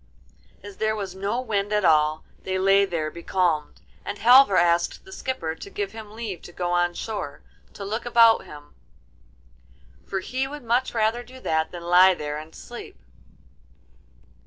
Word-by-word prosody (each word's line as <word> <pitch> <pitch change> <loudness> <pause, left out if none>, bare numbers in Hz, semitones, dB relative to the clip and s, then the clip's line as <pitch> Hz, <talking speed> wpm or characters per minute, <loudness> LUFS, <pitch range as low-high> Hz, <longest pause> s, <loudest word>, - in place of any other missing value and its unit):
As 205 -2 -10
there 215 0 0
was 195 -4 -5
no 200 +5 -2
wind 205 -4 -2
at 210 -2 +1
all 155 -1 +3 0.2
they 190 0 -2
lay 195 +1 +4
there 165 -5 -3
becalmed, 170 -3 -1 0.2
and 205 - -5
Halvor 245 -3 +6
asked 170 - +1
the 380 - -13
skipper 255 - -3
to 180 - -10
give 200 -1 -4
him 215 -1 -10
leave 215 -7 -5
to - - -12
go 175 0 -3
on 175 0 +1
shore 205 -10 -5 0.3
to 200 - -8
look 220 +3 -3
about 230 -1 +5
him, 145 -1 -13 1.3
for 195 -1 -2
he 260 +6 -2
would 295 0 -8
much 240 +2 0
rather 225 +2 +1
do 255 +2 -13
that 160 -4 0
than 175 -1 -9
lie 180 +2 +6
there 150 -2 -4
and 155 +1 -12
sleep. 240 - -10
195 Hz, 165 wpm, -24 LUFS, 170-225 Hz, 1.3 s, Halvor